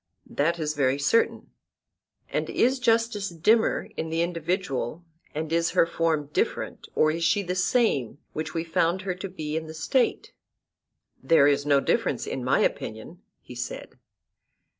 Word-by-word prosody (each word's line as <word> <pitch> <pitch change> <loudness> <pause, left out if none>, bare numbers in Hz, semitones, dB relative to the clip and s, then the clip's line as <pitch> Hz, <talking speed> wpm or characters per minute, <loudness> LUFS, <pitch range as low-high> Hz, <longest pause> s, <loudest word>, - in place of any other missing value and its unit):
That 165 +4 +1
is 155 -2 -2
very 135 -2 +1
certain. 145 +11 +1 0.8
And - - -2
is 255 +2 +2
justice 230 -4 +1
dimmer 210 +7 +2
in 160 - -3
the 165 +1 +1
individual, 170 - -2 0.3
and 155 +1 -3
is 165 0 +2
her - - +6
form 160 -3 -1
different, - - -2
or 155 - +4
is 165 +1 -3
she 175 +5 +2
the 180 -1 -2
same 180 - +1 0.2
which 155 +2 -4
we 165 - 0
found 170 +2 0
her 185 -1 -1
to 185 +2 -6
be 155 -4 -5
in 160 0 -3
the 160 - -8
State? 245 +11 0 0.9
There 165 -4 +5
is 145 0 +2
no 140 -1 +5
difference - - 0
in - - -4
my - - +2
opinion, 110 +11 -3 0.2
he - - -11
said. 125 0 -7
165 Hz, 160 wpm, -26 LUFS, 150-185 Hz, 0.9 s, her